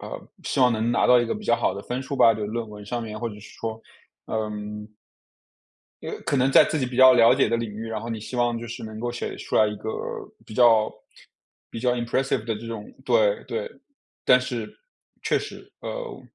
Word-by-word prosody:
呃， - - -6 0.2
希 - - -2
望 125 -1 +5
能 110 +1 0
拿 - - +3
到 125 -1 +6
一 120 - -1
个 - - -1
比 210 0 -8
较 - - +4
好 120 - 0
的 100 - -5
分 125 +2 -4
数 140 +1 -5
吧， 115 -3 +7
就 105 -1 -3
论 115 +1 -4
文 105 -1 -10
上 120 +3 -3
面， 110 -1 -6
或 120 - -1
者 105 - -9
是 - - -13 0.2
说， 115 0 -4 0.5
嗯 105 -1 -4 1.1
因 - - -5
为 - - -5
可 140 - 0
能 130 +1 +3
在 - - +8
自 160 - -1
己 130 - 0
比 125 0 -5
较 130 0 +8
了 115 0 +7
解 135 - +3
的 115 - +1
领 115 -2 -3
域， 110 +2 -6
然 110 -1 -3
后 115 +2 -6
你 110 - -3
希 120 - -8
望 120 -1 +1
就 120 - -7
是 115 - -7
能 110 0 -7
够 120 +1 -2
写 120 - -4
出 - - -6
来 110 - +6
一 105 - -3
个， 110 - -7 0.6
比 - - -12
较 115 -2 +5 0.8
比 - - -6
较 125 0 +2
impressive 120 -1 -1
的 115 - -1
这 115 - -9
种 115 -2 -7
对 - - +3
对， 475 +1 -4 0.5
但 125 - +7
是 125 -3 -4 0.5
确 - - +2
实， - - -9
呃， - - -6
115 Hz, 285 characters per minute, -25 LUFS, 110-125 Hz, 1.1 s, 在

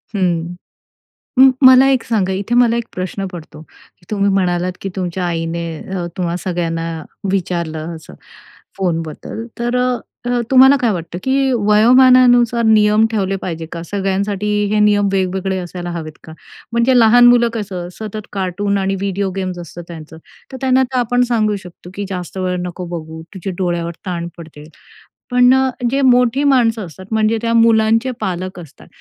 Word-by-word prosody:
हं. 175 -2 -1 0.8
मग 265 0 +8 0.2
मला 260 +1 +7
एक 260 -3 +1
सांगा. 200 -5 0
इथे 200 +5 -2
मला 235 -1 +4
एक 235 - -3
प्रश्न 185 +2 -4
पडतो 170 -4 -10
की 175 +2 -25
तुम्ही 200 -1 +1
म्हणालात, 180 -1 0
की 195 - -4
तुमच्या 180 -1 -3
आईने 170 0 -3
अ, 185 -2 -5
तुम्हा 175 -1 -1
सगळ्यांना 165 -2 -3 0.4
विचारलं 170 -3 -3
असं, 160 - -13 0.6
फोनबद्दल. 170 +4 -4
तर 240 +1 -1 0.7
तुम्हाला 265 +1 +7
काय 235 - +2
वाटतं? 175 -2 -5
की 270 0 +1
वयोमानानुसार 240 +2 +5
नियम 215 0 +4
ठेवले 195 -3 -1
पाहिजे 165 -3 -5
का? 170 - -6
सगळ्यांसाठी 200 +1 -2 0.3
हे 210 - +2
नियम 205 -1 +3
वेगवेगळे 190 0 -1
असायला 175 0 -6
हवेत 160 -2 -6
का? 160 - -11 0.4
म्हणजे 235 +2 +3
लहान 240 +2 +6
मुलं 240 -1 +5
कसं, 190 -6 -5
सतत 215 -1 -7
कार्टून 200 +1 -1
आणि 195 0 -1
व्हिडिओ 195 0 -2
गेम्स 185 -2 -4
असतात 175 0 -9
त्यांचं, 160 -1 -10 0.3
तर 260 - -7
त्यांना 260 0 +3
तर 260 0 -3
आपण 245 +1 +1
सांगू 215 -3 +1
शकतो 180 0 -13
की 200 0 -4
जास्त 180 0 -6
वेळ 185 -1 -1
नको 180 0 -6
बघू, 160 0 -9
तुझ्या 190 0 -5
डोळ्यावर 175 -2 -2
ताण 170 -2 -3
पडते. 155 -3 -12 0.7
पण 250 0 +5
अ, 265 0 +2 0.2
जे 275 +1 +1
मोठी 250 +1 +3
माणसं 235 -6 +2
असतात, 185 +3 -12
म्हणजे 220 +1 +1
त्या 230 - 0
मुलांचे 225 +2 +3
पालक 185 0 -4
असतात, 160 -5 -14
195 Hz, 155 wpm, -17 LUFS, 175-230 Hz, 0.8 s, मग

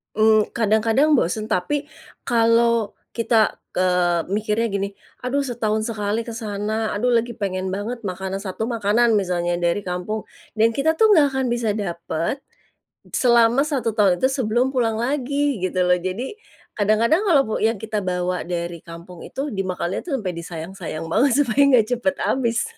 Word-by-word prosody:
Mmm, 215 0 +4
kadang-kadang 225 +7 +2
bosen 215 -1 0
tapi 285 - -1 0.4
kalau 230 -1 +3 0.2
kita, 230 -2 +2 0.2
eee, 180 -2 +1
mikirnya 215 +3 0
gini, 200 0 -2 0.3
"Aduh 260 +3 0
setahun 220 -4 -1
sekali 215 0 -2
ke 230 - -6
sana, 215 0 -2
aduh 245 +4 +1
lagi 235 +1 +1
pengen 190 -3 -3
banget 225 +5 -4
makanan" 190 0 -4
satu 210 +3 -3
makanan 230 0 +2
misalnya 175 -3 0
dari 175 +2 0
kampung, 180 +5 -4 0.3
dan 225 +1 +2
kita 320 +4 +2
tuh 440 -1 +6
nggak 300 -4 +5
akan 265 -1 -1
bisa 235 -2 0
dapat 175 - -3 0.7
selama 235 +1 +4
1 255 -8 -2
tahun 195 -5 +3
itu 260 - +3
sebelum 255 -1 0
pulang 225 -3 +1
lagi 280 +2 0
gitu 185 0 -1
loh. 180 - +5
Jadi 200 - -4 0.4
kadang-kadang 220 - +2
kalau 330 -9 +4
pu 220 - -3
yang 225 0 +2
kita 215 -1 -3
bawa 180 0 -1
dari 170 -1 -4
kampung 170 +1 -11
itu 275 +2 -5
dimakannya 185 -2 -2
itu 345 - -9
sampai 185 -5 -3
disayang-sayang 170 0 -6
banget 235 - +2
supaya 245 +1 +1
nggak 230 -4 +5
cepat 280 +4 -1
habis. 235 -3 0
220 Hz, 155 wpm, -22 LUFS, 185-240 Hz, 0.7 s, tuh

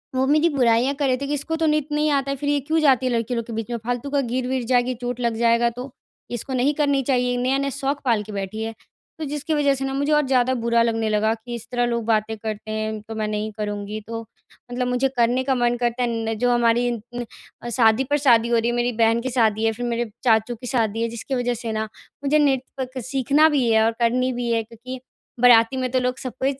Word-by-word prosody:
वो 260 +1 +2
मेरी 305 +3 +4
बुराइयाँ 250 -2 +2
कर 285 - +1
रहे 255 -1 +2
थे 280 +2 -4
कि 290 - -2
इसको 295 +3 -2
तो 325 0 0
नृत्य 300 -1 0
नहीं 300 +1 +2
आता 275 -1 0
है - - -1
फिर 285 +1 -2
ये 290 0 +2
क्यों 315 +4 0
जाती 265 -4 +3
है 255 - +1
लड़की 235 +1 -1
लोग 230 -1 -2
के 235 - -6
बीच 225 +1 -4
में। 235 - -1
फ़ालतू 245 +3 -3
का 285 0 +1
गिर-विर 255 +1 -2
जाएगी 250 0 +3
चोट 245 0 -3
लग 235 -2 0
जाएगा 235 0 +3
तो। 255 +2 -7 0.4
इसको 240 +3 -4
नहीं 260 +3 +2
करनी 285 -2 +2
चाहिए, 250 -1 +1
नया-नया 270 +3 0
शौक 275 +1 -2
पाल 230 -4 +2
के 215 - -10
बैठी 200 +2 -4
है। 225 0 -4 0.5
तो 315 - -3
जिसकी 295 +2 -3
वजह 290 -2 +3
से 270 0 -3
न 270 - -2
मुझे 285 +2 0
और 300 -1 +3
ज़्यादा 260 -1 +2
बुरा 235 0 +3
लगने 225 -1 0
लगा 215 +1 +2
कि 230 +2 -7
इस 235 -1 -9
तरह 245 -1 +1
लोग 235 -1 -2
बातें 220 0 +1
करते 215 0 -5
हैं, 215 0 -3
तो 225 +1 -9
मैं 215 -1 -2
नहीं 215 0 -3
करूँगी 205 0 -4
तो 230 0 -4 0.5
मतलब 250 0 -1
मुझे 250 +2 +1
करने 240 +2 +2
का 265 0 +1
मन 240 -1 +1
करता 240 +1 0
है - - +1 0.2
न - - 0
जो 245 +1 +2
हमारी 240 0 +2 0.3
न 245 0 -3 0.5
शादी 225 0 +4
पर 290 - +4
शादी 235 -5 +4
हो 235 - +3
रही 230 +1 +1
है। 240 - -1
मेरी 240 0 +1
बहन 225 +1 +3
की 260 - -3
शादी 220 -3 +2
है 225 - +3
फिर 245 +3 -5
मेरे 235 -1 -2
चाचू 225 0 +2
की 250 +2 -9
शादी 225 -3 0
है 230 - +1
जिसकी 235 +4 -4
वजह 245 -1 0
से 230 -1 -5
न 220 0 -2 0.4
मुझे 290 +2 +3
नृत्य 265 -2 -1
सीखना 275 +5 +3
भी 270 -6 +1
है 220 0 +4
और 225 - +3
करनी 250 +2 +2
भी 240 -1 -2
है, 230 -1 +1
क्योंकि 235 +3 -9 0.4
बराती 235 +1 +6
में 255 -1 -1
तो 260 - +2
लोग 250 0 -1
सबको 255 -1 -5
245 Hz, 250 wpm, -22 LUFS, 230-270 Hz, 0.5 s, बराती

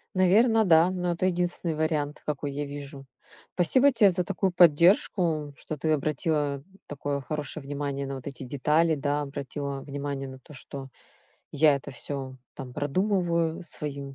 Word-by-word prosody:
Наверно, 220 +5 +4
да, 165 -1 +6
но 180 -1 -1
это 170 +2 -2
единственный 175 -2 -1
вариант, 155 -2 -1
какой 145 -1 -3
я 145 +1 -3
вижу. 140 -1 -8 0.5
Спасибо 260 +10 +5
те 220 -5 +5
за 180 0 0
такую 195 +1 -1
поддержку, 170 -2 +3
что 155 - -6
ты 155 +2 -1
обратила 145 -1 0 0.2
такое 145 0 -3
хорошее 150 +1 -4
внимание 140 -1 -3
на 135 - -4
вот 130 - -9
эти 140 -1 -6
детали, 150 +5 +2
да, 145 +1 -1
обратила 140 0 -5
внимание 140 -1 -5
на 130 0 -10
то, 140 - -16
что 135 0 -8 0.6
я 150 0 +4
это 140 +1 -8
всё, 135 0 -6 0.2
там, 130 -3 -8
продумываю, 170 +1 0
своим, 140 -4 -6
150 Hz, 155 wpm, -27 LUFS, 140-170 Hz, 0.6 s, да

